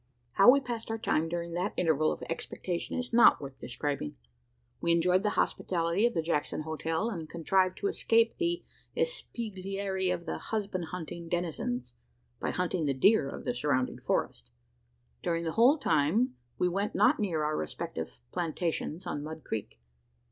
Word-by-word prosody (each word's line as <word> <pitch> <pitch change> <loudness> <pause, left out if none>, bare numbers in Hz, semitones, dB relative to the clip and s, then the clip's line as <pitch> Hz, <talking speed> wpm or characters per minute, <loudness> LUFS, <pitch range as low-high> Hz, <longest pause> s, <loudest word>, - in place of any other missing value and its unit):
How 195 - +7
we 275 +3 +8
passed 240 -4 -5
our 225 - -1
time 165 -7 0
during 170 0 -3
that 180 +4 -1
interval 155 -2 +3
of - - -5
expectation 170 +3 -3
is 250 -1 -3
not 235 - +7
worth 135 -2 -8
describing. 130 - -3 0.7
We 170 - +3
enjoyed 180 +2 +3
the 210 - +1
hospitality 175 +5 +1
of 240 - -4
the 165 - +1
Jackson 155 -2 -1
hotel; 160 +7 -1
and 165 -6 -5
contrived 185 +2 +1
to 200 - -1
escape 230 +2 +3
the 345 0 0 0.3
espieglerie 195 - -2
of 175 -2 -2
its - - -4
husband 200 -5 -2
hunting 170 -1 -6
denizens, 130 -8 -2 0.5
by - - -1
hunting 180 -2 -1
the 135 - +1
deer 145 0 +4
of - - -7
the - - 0
surrounding 130 0 0
forest. - - -1 0.7
During 165 0 0
the 165 - -1
whole 245 - +5
time, 210 - +2 0.2
we 180 - +2
went 195 +4 -1
not 265 +4 +4
near 170 -7 0
our 155 0 0
respective 75 -5 -5
"plantations" 165 0 -2
on 145 - -3
Mud 155 +1 -7
Creek. 105 - -5
175 Hz, 160 wpm, -30 LUFS, 155-205 Hz, 0.7 s, we